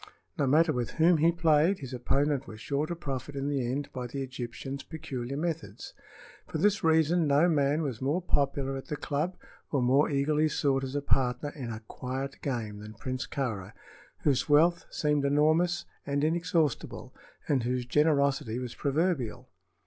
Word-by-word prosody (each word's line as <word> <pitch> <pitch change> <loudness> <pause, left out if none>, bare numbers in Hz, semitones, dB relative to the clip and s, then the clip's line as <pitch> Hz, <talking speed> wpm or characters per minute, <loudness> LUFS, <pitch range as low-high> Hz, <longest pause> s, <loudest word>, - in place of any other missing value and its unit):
No 140 - +1
matter 155 +4 +4
with 120 -3 -2
whom 165 +1 +5
he 165 +2 +5
played, 165 +2 +3
his 135 -5 -8
opponent 135 +3 0
was 110 - -9
sure 140 +6 -1
to 175 - -3
profit 140 -3 -5
in 140 0 -2
the 140 -3 0
end 140 +2 -4
by 125 -1 -4
the 135 +3 -4
Egyptian's 130 +2 -6
peculiar 140 -5 -5
methods. 165 +1 -4 0.5
For - - -3
this 205 -1 +2
reason 160 +1 +3
no 145 +4 +4
man 150 -1 +2
was 130 -6 -4
more 145 +7 +1
popular 140 -5 0
at 135 - -7
the 150 - -3
club 150 +5 -2 0.3
or 140 - +2
more 130 +4 +3
eagerly 150 +2 +2
sought 135 -3 +1
as 135 +1 -4
a 145 - -1
partner 125 +1 +1
in 130 -6 -6
"a 110 0 -6
quiet 130 +4 -5
game" 110 -6 -3
than 105 +1 -10
Prince 130 +3 -4
Kāra, 110 -7 -3 0.5
whose 140 0 +2
wealth 170 +4 +4
seemed 150 -2 +1
enormous 155 +5 +2 0.2
and 140 0 -1
inexhaustible 165 -3 0 0.3
and 135 -3 +2
whose 125 +1 -1
generosity 140 -4 +2
was 125 -1 -4
proverbial. 140 -5 -1
140 Hz, 170 wpm, -29 LUFS, 130-155 Hz, 0.5 s, whom